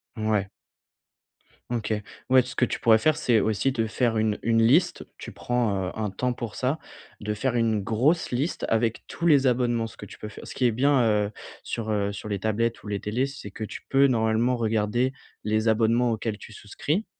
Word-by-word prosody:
Mouais. 110 -3 0 1.2
OK. 110 -2 -1 0.4
Ouais 130 0 +7
tout 125 - -9
ce - - -8
que 125 - +3
tu - - -4
pourrais 110 -1 +6
faire 155 +6 +2
c'est 120 -5 +2
aussi 110 +6 +1
te 115 -3 -1
faire 115 0 0
une 110 -1 +1
une 115 0 +3
liste, 160 +11 +3
tu - - -8
prends, 105 -7 -1
heu, - - -4
un 110 -2 -2
temps 125 +5 -1
pour 115 -3 -6
ça, 130 +4 0 0.4
de 105 0 -2
faire 120 +3 -1
une 110 -3 +1
grosse 125 - +1
liste 140 +8 -1
avec 115 0 0
tous 170 - -5
les 140 -5 +5
abonnements. 120 -2 +1
Ce - - -14
que - - -8
tu - - -13
peux 105 - -6
fai - - -11
ce - - -8
qui 130 - 0
est 120 - +4
bien, 135 +4 +3
heu, 105 -2 +1 0.3
sur 110 -1 -4
heu 100 -1 0
sur 100 - -7
les 100 -2 -2
tablettes 115 +3 -1
ou - - -10
les 100 -1 -2
télés 115 +6 -1
c'est 135 -7 -9
que 110 - -7
tu 110 - -6
peux 140 +1 +5
normalement 115 0 +1
regarder 115 +3 0 0.3
les 110 +1 +1
abonnements 115 +2 +3
auxquels 110 -1 -2
tu 110 - -12
souscris. 150 - -3
115 Hz, 215 wpm, -26 LUFS, 110-125 Hz, 1.2 s, Ouais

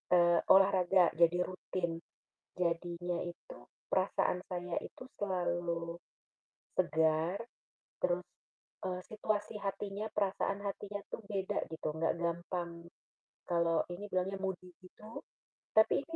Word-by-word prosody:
eee, 175 -1 +6
olahraga 190 -1 +6
jadi 170 +1 +5
rutin, 185 -1 -2 0.7
jadinya 175 0 0
itu 175 - -8 0.3
perasaan 180 - +2
saya 180 -1 -3
itu - - -9 0.2
selalu, 175 -3 -1 0.8
segar, 160 +3 +3 0.6
terus, 180 0 +1 0.6
eee, 180 -1 -2
situasi 215 0 -1
hatinya, 200 +1 -3
perasaan 195 0 +1
hatinya 205 0 -3
tuh - - -3
beda 195 -2 -1
gitu 160 - -3
nggak 160 +1 +1
gampang 170 +1 -1 0.8
kalau 170 -1 +3
ini 195 +4 -6
bilangnya 185 +1 0
moody 185 -1 -3
gitu, 215 +4 -10 0.5
tapi 220 +5 +5
ini 330 - -6
180 Hz, 110 wpm, -34 LUFS, 170-195 Hz, 0.8 s, eee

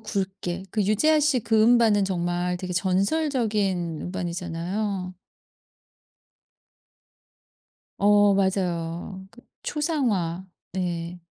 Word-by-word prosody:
굵게. 190 -3 -4
그 215 - 0
유재하씨 295 +6 +3
그 220 0 +2
음반은 225 -3 +5
정말 180 -1 -1
되게 185 0 -5
전설적인 195 - 0
음반이잖아요. 180 +2 -3 2.8
어 205 0 +5
맞아요. 185 -1 -1
그 245 - -17 0.2
초상화. 220 - -1 0.3
네. 175 -1 -3
190 Hz, 180 characters per minute, -25 LUFS, 175-215 Hz, 2.8 s, 음반은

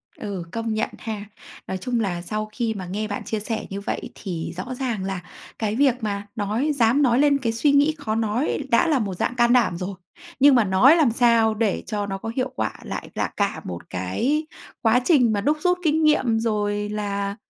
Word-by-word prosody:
Ừ, 200 -5 -5
công 225 +1 -2
nhận 215 - 0
ha. 215 -2 -5 0.4
Nói 190 - -3
chung 240 +4 -2
là 180 -5 -1
sau 215 +3 -4
khi 230 -1 -1
mà 190 -3 -6
nghe 210 +4 -3
bạn 205 - -4
chia 220 - -3
sẻ 220 +1 -3
như 200 +1 -5
vậy - - -4
thì 175 -5 -5
rõ 250 +7 -5
ràng 235 -7 -2
là 190 -2 -3 0.4
cái 215 -1 -1
việc 265 -1 +4
mà 205 -1 -3
nói 220 +8 0
dám 240 +2 +3
nói 250 -2 +3
lên 285 -1 +4
cái 240 -4 -1
suy 280 +6 +2
nghĩ 290 +2 +4
khó 220 -6 -3
nói 225 +5 0
đã 235 - +4
là 295 -5 +2
một 200 -4 -2
dạng 245 - -1
can 240 0 +4
đảm 230 -9 +3
rồi, 185 +2 -4 0.4
nhưng 280 0 +7
mà 240 - +5
nói 205 - +6
làm 295 -9 +4
sao 230 -2 +4
để 215 -3 0
cho 205 -1 -2
nó 195 -1 -4
có 225 +3 -5
hiệu 255 0 0
quả - - -1
lại - - -6
là - - 0
cả 200 -1 0
một 85 -1 -7
cái 235 - -1 0.4
quá 230 +2 +4
trình 255 -10 +4
mà 205 - 0
đúc 295 +8 +1
rút 360 0 +2
kinh 315 0 +2
nghiệm, 260 -7 +3
rồi 210 -2 -1
là 200 -1 -2
225 Hz, 220 wpm, -23 LUFS, 200-255 Hz, 0.4 s, nhưng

